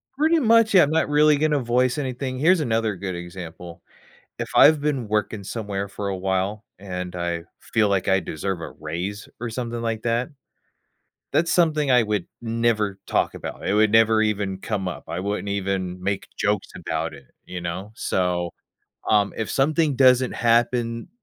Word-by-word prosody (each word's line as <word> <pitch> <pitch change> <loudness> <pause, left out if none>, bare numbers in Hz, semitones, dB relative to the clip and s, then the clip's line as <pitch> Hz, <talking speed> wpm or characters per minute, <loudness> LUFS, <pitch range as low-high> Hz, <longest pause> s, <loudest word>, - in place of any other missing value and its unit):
Pretty 315 +4 +3
much, 230 -4 +4
yeah, 185 - +8
I'm 145 - +1
not 160 -1 +1
really 150 0 +5
gonna 150 0 +2
voice 125 +2 +1
anything. 130 -2 -3
Here's 170 +5 +4
another 115 -6 0
good 95 0 -5
example. 85 -1 -9 0.6
If - - -3
I've 155 0 +7
been 140 -6 -1
working 105 0 -1
somewhere 100 -2 -4
for 100 +1 -5
a 95 - -2
while, 95 +3 -1
and 90 -2 -6
I 85 -1 -2 0.3
feel 110 -2 +4
like 100 -1 0
I 95 -1 +4
deserve 90 +2 -4
a - - -6
raise 90 +6 -5
or 120 -1 -3
something 120 0 -4
like 115 -1 -2
that. 120 +3 0 1.0
That's 165 +1 +2
something 155 -5 +2
I 125 -1 +6
would 105 -4 -1 0.2
never 115 -3 0
talk - - 0
about. - - -6
It - - +1
would 105 0 +4
never 110 0 +5
even 100 -3 -1
come 100 -2 -3
up. 90 - -5
I 85 - -3
wouldn't 100 +1 -3
even 95 -2 -2
make 100 +1 -2
jokes 105 -1 0
about - - -3
it, 70 -2 -13 0.2
you 90 - -6
know? 85 +4 -5
So, 90 -4 -1 0.6
um, 105 -2 +3
if 110 - -3
something 150 +1 +2
doesn't 130 -1 +5
happen, 115 0 +1
110 Hz, 170 wpm, -23 LUFS, 95-130 Hz, 1.0 s, yeah